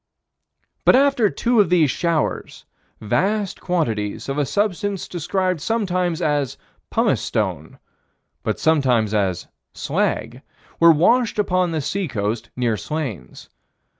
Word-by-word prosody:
But - - +6
after 270 -5 +3
two 240 +2 +1
of 195 - +1
these 165 -6 +3
showers, 165 -1 -2 0.3
vast 195 - -1
quantities 115 - -2
of 135 +2 -2
a 145 - 0
substance 205 - -1
described 185 0 -1
sometimes 185 -5 -1
as 145 -4 0 0.3
"pumice - - +1
stone," - - -3 0.6
but - - -2
sometimes 125 -9 +2
as 95 -5 0 0.3
"slag," - - -2 0.4
were 170 0 +8
washed 225 +11 +3
upon 185 -3 +1
the 160 -2 -2
sea 190 +6 -2
coast 110 -2 -3
near 120 -3 0
Slains. 125 - -6
165 Hz, 120 wpm, -21 LUFS, 125-195 Hz, 0.6 s, were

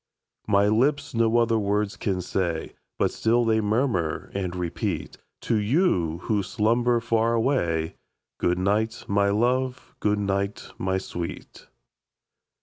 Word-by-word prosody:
My 100 +1 +4
lips 130 +8 +1
no 115 0 +3
other 115 -1 +3
words 105 0 0
can 95 -3 -2
say, 85 -2 -2 0.2
But - - +1
still 120 +2 +2
they 110 -1 +2
murmur 105 - 0
and 95 -2 -3
repeat 90 -2 -3 0.2
To 115 - +1
you, 105 - +1
who 105 -2 +1
slumber 120 +3 +1
far 115 0 +1
away, 85 - 0 0.4
Good 90 0 +1
night, 105 +4 0
my 100 0 +2
love! 125 +4 0
good 105 0 +1
night, 100 0 -2
my 95 +1 0
sweet! 85 -2 -7
105 Hz, 130 wpm, -25 LUFS, 95-115 Hz, 0.4 s, My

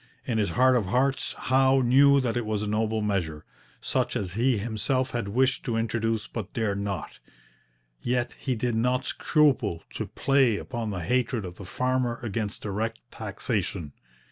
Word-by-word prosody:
In 115 -3 0
his 105 - +1
heart 130 0 +5
of 110 -6 +1
hearts 130 +6 +1
Howe 130 +1 +3
knew 140 +3 +6
that 120 -3 -1
it 120 - 0
was 105 -1 -2
a - - -2
noble 110 +1 0
measure, 85 -7 -2 0.4
such - - -1
as 90 -4 -2
he 120 +3 +2
himself 120 +5 -1
had 120 -4 -2
wished 125 +4 +1
to 115 -2 0
introduce 115 -1 0
but 110 -4 -6
dared 105 -3 -1
not; 100 -2 -4 0.8
yet 125 0 0
he 130 -3 -1
did 120 +1 -1
not 125 +3 +1
scruple 130 - +2
to - - -4
play 135 -5 +2
upon 120 -2 -4
the 90 -4 -3
hatred 125 -1 0
of 90 0 -8
the 100 - -9
farmer 125 +3 0
against 110 -2 -3
direct 110 +3 -2
taxation. 100 - -3
115 Hz, 170 wpm, -27 LUFS, 105-125 Hz, 0.8 s, knew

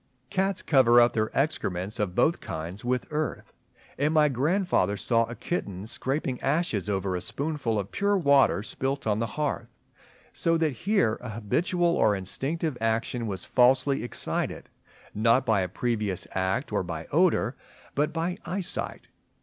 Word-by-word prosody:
Cats 190 0 0
cover 120 -5 +5
up 120 0 +5
their 110 -1 0
excrements 105 - -1
of 100 -4 -1
both 170 +2 +3
kinds 85 +5 -6
with 125 0 0
earth; 150 0 -3 0.5
and 150 +3 +1
my 150 -1 +5
grandfather 140 - +1
saw 115 +4 +2
a 120 - -8
kitten 100 - -4
scraping 130 +2 -2
ashes 135 - 0
over 95 -2 -1
a 90 - -3
spoonful 140 - -2
of 100 -2 -3
pure 200 0 +1
water 140 - +4
spilt 135 +4 -3
on 105 -1 +1
the 115 - 0
hearth; 150 -1 -2 0.6
so 165 0 +2
that 160 -2 +1
here 140 - +1
an 125 - -6
habitual 170 - 0
or 110 - +3
instinctive 135 - -2
action 115 +1 -1
was 95 -3 -4
falsely 130 +2 +3
excited, 120 - -3 0.4
not 115 +5 +3
by 110 -5 +3
a 90 - -2
previous 105 -2 -2
act 95 0 -1
or - - +2
by - - -5
odour, - - +2 0.4
but 150 +2 +1
by 170 +3 -2
eyesight. 185 0 -4
125 Hz, 155 wpm, -27 LUFS, 105-155 Hz, 0.6 s, cover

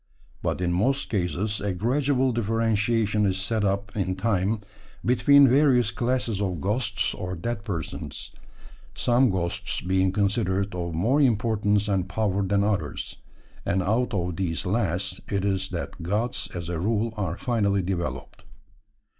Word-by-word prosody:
But - - -1
in 85 -1 +1
most 130 +10 +1
cases 100 +2 -1
a 100 -1 -1
gradual 130 +5 +1
differentiation 110 -1 +1
is 95 -2 +1
set 105 +3 -1
up 100 +1 -1
in 95 -3 -1
time 100 +1 0 0.4
between 140 +3 +6
various 125 -4 +4
classes 120 -4 -1
of 90 -4 -1
ghosts 105 - 0
or 90 0 -4
dead 105 +4 -4
persons, 90 -7 -5 0.6
some 125 +1 +3
ghosts 90 -3 -1
being 95 +1 +1
considered 100 -1 0
of 85 -2 -3
more 125 - +2
importance 105 -4 +2
and 95 -2 0
power 100 -1 0
than 100 +1 +1
others; 105 -1 -2 0.5
and 95 +2 0
out 115 +6 +1
of 90 -2 -2
these 90 -1 -2
last 95 -2 -1
it 100 -1 0
is 95 -1 0
that - - -5
gods 105 +8 -1
as 85 -1 -4
a 85 -1 -3
rule 110 +4 0
are 95 -5 -2
finally 105 -7 +1
developed. 85 -2 -4
100 Hz, 145 wpm, -26 LUFS, 95-115 Hz, 0.6 s, between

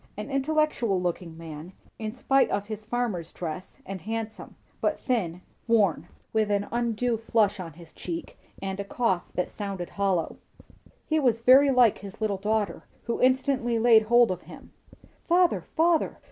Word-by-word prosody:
An 210 +7 -6
intellectual 275 -7 +1
looking 175 -2 -3
man, 165 +2 -9 0.3
in 215 +1 -4
spite 270 +1 +3
of 200 - -1
his 215 0 -7
farmer's 220 -8 -2
dress, 170 +1 -6
and 190 -2 -6
handsome; 220 +2 -5 0.3
but - - 0
thin, 185 -9 -1 0.3
worn, 200 -8 +2 0.3
with 215 -1 +2
an 205 0 0
undue 235 0 0
flush 215 -2 +1
on 165 -4 -6
his 165 0 -15
cheek, 170 -2 -6 0.3
and 195 0 -3
a - - -1
cough 200 -3 -1
that 180 - -1
sounded 195 -4 -5
hollow. 195 -4 0 0.7
He 315 0 +1
was 240 -5 +2
very 265 +4 +7
like 250 -5 +4
his 200 -1 -10
little 215 -3 0
daughter, 210 +1 -1 0.2
who 235 - -3
instantly 255 -2 +2
laid 225 -1 +6
hold 240 0 +4
of 180 -1 -4
him. - - -13 0.5
"Father, 355 +1 +3
father! 330 0 +2
215 Hz, 160 wpm, -27 LUFS, 185-245 Hz, 0.7 s, very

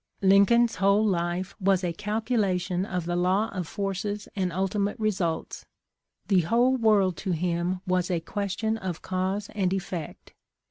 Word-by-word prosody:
" - - -45
Lincoln's 200 +5 +5
whole 200 +2 +3
life 180 -1 -1
was 190 -1 +2
a 175 -1 -1
calculation 205 -3 -1
of 180 -4 -3
the 175 0 -1
law 185 +5 +1
of 180 -4 -4
forces 205 +2 -3
and 185 -3 -1
ultimate 195 +4 -1
results. 190 -7 -2 0.6
The 195 -3 +4
whole 240 +9 +3
world 210 -6 +3
to 190 -3 -2
him 175 +2 -1
was 180 -1 0
a 175 -2 +1
question 205 +5 -2
of 185 -5 -5
cause 190 +2 -2
and 190 -4 0
effect. 180 -5 -5
190 Hz, 150 wpm, -26 LUFS, 180-210 Hz, 0.6 s, Lincoln's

